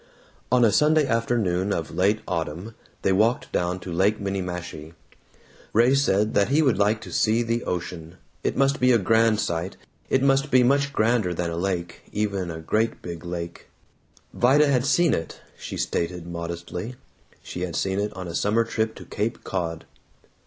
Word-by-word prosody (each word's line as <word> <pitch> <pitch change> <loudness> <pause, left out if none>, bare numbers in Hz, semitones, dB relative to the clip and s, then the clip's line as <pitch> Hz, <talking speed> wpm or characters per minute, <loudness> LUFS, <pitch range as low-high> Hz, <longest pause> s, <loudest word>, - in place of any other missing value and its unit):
On 125 -1 +5
a 110 - +4
Sunday 155 +3 +4
afternoon 115 -6 0
of 80 -5 -2
late 100 +4 +2
autumn 85 +6 -3 0.3
they - - +3
walked 110 +6 +2
down 90 +1 -1
to 90 - -7
Lake 100 +5 +2
Minniemashie. 90 -5 -5 0.8
Ray 120 +4 +5
said 105 -7 +2
that 100 +2 +3
he 150 +3 +3
would 130 -7 +2
like 105 +2 +2
to - - -9
see 115 +2 +2
the 115 +1 -1
ocean; 85 -1 -5 0.3
it - - -1
must 135 +2 +2
be 125 0 +4
a 120 - +6
grand 110 +1 +3
sight; 85 +2 -2 0.3
it 130 - +2
must 135 +1 +3
be 130 -2 +5
much 140 +3 +2
grander 110 -7 +1
than 85 0 -2
a - - -3
lake, 85 -1 -3
even 100 -4 -1
a 80 -1 -6
great 110 +7 -1
big 85 -1 -7
lake. 85 -1 -6 0.7
Vida 135 +5 +4
had 135 -2 +2
seen 175 +1 +3
it, 80 - -4 0.2
she - - -7
stated 85 0 -2
modestly; 85 +6 -5 0.5
she 90 - -7
had 90 -3 -3
seen 95 0 0
it 105 +1 -1
on 95 -2 -7
a 85 - -6
summer 105 +6 +2
trip 110 -1 -2
to - - -11
Cape 110 +3 -3
Cod. 85 -4 -3
100 Hz, 175 wpm, -24 LUFS, 90-120 Hz, 0.8 s, a